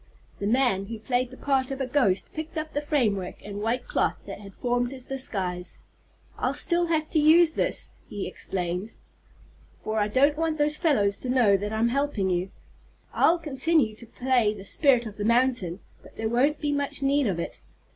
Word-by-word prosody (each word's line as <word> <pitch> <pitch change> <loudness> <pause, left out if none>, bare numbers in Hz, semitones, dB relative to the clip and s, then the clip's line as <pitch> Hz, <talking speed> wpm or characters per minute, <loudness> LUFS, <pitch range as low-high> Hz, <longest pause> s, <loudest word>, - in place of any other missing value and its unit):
The 200 - -2
man 225 -5 +2
who 225 +1 -5
played 245 +3 -1
the 260 - -12
part 270 -2 0
of 270 0 -4
a 265 - 0
ghost 245 -8 +1
picked 315 +1 -6
up 310 0 -4
the 290 - -1
framework 220 - 0
and 205 0 -6
white 240 +3 -1
cloth - - 0
that - - -7
had 195 -1 -12
formed 245 0 0
his 260 -2 -8
disguise. 185 -9 -4 0.6
"I'll - - 0
still 345 0 +2
have 315 -2 0
to 315 - +3
use 320 +2 +6
this," - - 0 0.2
he 205 -2 -4
explained, 180 +3 -4 0.9
"for 215 0 -1
I 205 - +2
don't 280 +7 +3
want 320 -1 0
those 300 0 +2
fellows 215 - +2
to 255 - -6
know 240 -6 +4
that 205 +2 -2
I'm 220 +2 +1
helping 245 -8 0
you. 180 +2 -1 0.6
I'll 340 - +4
continue 295 -5 +1
to 235 - -8
play 245 -3 +1
the 195 -1 -10
spirit 255 0 +3
of 210 -2 -8
the 205 - -3
mountain, 235 -6 +1 0.2
but - - -17
there 220 0 -2
won't 275 +6 +2
be 295 -1 -1
much 285 -1 -2
need 280 -1 +2
of 185 -4 -1
it. - - -6
245 Hz, 195 wpm, -26 LUFS, 205-290 Hz, 0.9 s, use